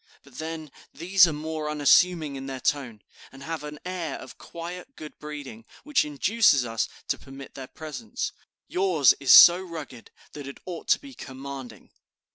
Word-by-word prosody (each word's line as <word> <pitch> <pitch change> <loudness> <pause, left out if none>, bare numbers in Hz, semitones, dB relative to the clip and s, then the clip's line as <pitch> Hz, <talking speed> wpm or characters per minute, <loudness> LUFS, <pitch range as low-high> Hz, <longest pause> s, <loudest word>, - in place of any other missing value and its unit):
But 140 -3 -14
then, 160 -2 -6 0.2
these 180 +3 +4
are - - -1
more 155 0 -4
unassuming 150 +1 +3
in 135 0 -7
their 135 -1 -5
tone, 125 -6 -2 0.3
and 135 +1 -13
have 160 0 -5
an 150 0 -7
air 175 -5 -4
of 130 - -12
quiet 180 +9 -9
good 155 - -11
breeding, 145 -7 -8 0.2
which 295 -3 +2
induces 150 - +3
us 115 -1 -2 0.2
to - - 0
permit 135 0 -12
their 135 -1 -8
presence. 135 -9 -6 0.4
Yours 180 -8 +4
is 135 -3 +2
so 175 +1 +10
rugged 155 -9 -9 0.2
that 145 -2 -9
it 140 - -9
ought 175 -3 -7
to - - +4
be 275 -1 -12
commanding." 135 - -9
150 Hz, 165 wpm, -26 LUFS, 135-170 Hz, 0.4 s, so